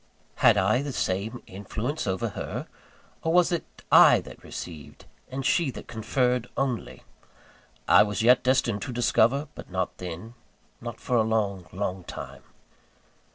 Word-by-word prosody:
Had - - +5
I 105 +6 +3
the 145 0 -4
same 105 +4 -2
influence 105 +9 -4
over 95 -1 -1
her? - - -5 0.6
Or 160 - 0
was 175 +1 +4
it 170 - -5
I - - +8
that - - -13
received, 80 -4 -9 0.2
and 130 +1 -4
she 170 -1 +2
that 125 - -8
conferred, 125 +1 0
only? 130 -4 -2 0.8
I - - +7
was 105 +1 0
yet 125 +2 +6
destined 125 -5 +1
to 130 - -4
discover; 125 +4 +2
but - - -11
not 95 0 -2
then 90 +6 -7 0.5
not 120 -1 -6
for 125 -3 0
a - - +5
long, 105 -5 -1
long 95 -1 -3
time. - - -8
115 Hz, 150 wpm, -26 LUFS, 100-130 Hz, 0.8 s, I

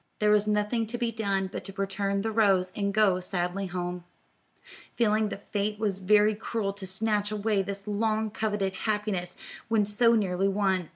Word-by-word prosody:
There 210 0 +3
was 210 0 +3
nothing 210 +2 0
to 240 +3 -3
be 235 -1 -1
done 200 -3 -1
but - - -5
to 195 - -7
return 195 0 -1
the 225 - -1
rose 195 -4 +3
and 200 -1 0
go 200 -3 +3
sadly 180 +1 -2
home, 180 0 -4 0.9
feeling 215 -2 +2
that 200 - -9
fate 210 +1 -1
was 205 -3 -1
very 210 +3 +4
cruel 210 -1 -3
to 200 -1 -6
snatch 210 +2 0
away 210 -1 0
this 200 +1 -5
long 215 +1 0
coveted 205 -3 -1
happiness 205 -3 -2 0.3
when 220 -2 +3
so 230 +3 +4
nearly 195 -3 +1
won. 190 -3 0
205 Hz, 175 wpm, -28 LUFS, 195-215 Hz, 0.9 s, very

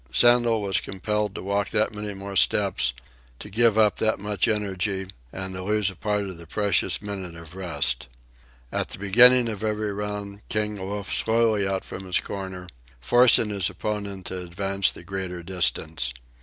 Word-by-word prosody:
Sandel 120 - +4
was 95 -2 +1
compelled 105 +1 -2
to - - -6
walk 100 0 -1
that 110 0 +1
many 105 -1 -5
more 100 0 -7
steps, 95 -9 +2 0.5
to 105 - -10
give 115 +1 +3
up 105 -2 +4
that 110 0 +1
much 105 -1 0
energy, 100 -2 -1 0.3
and 95 0 -4
to 95 - -5
lose 105 0 +1
a - - -14
part 105 +2 -1
of 95 -4 -7
the 85 - -11
precious 105 +3 +1
minute 95 -4 -6
of 85 -1 -12
rest. 75 -9 -1 0.6
At - - -1
the - - -7
beginning 120 +5 +7
of 110 -2 -5
every 105 -1 -1
round 105 0 -5
King 105 0 0
loafed 100 0 -4
slowly 110 -3 +2
out 95 0 -2
from 95 - -7
his 90 - +1
corner, 95 -2 -6 0.3
forcing 115 - +5
his 100 -3 0
opponent 100 -3 -4
to 95 - -4
advance 95 +2 0
the - - -12
greater 90 -1 -5
distance. 80 -6 -1
100 Hz, 170 wpm, -25 LUFS, 95-105 Hz, 0.6 s, beginning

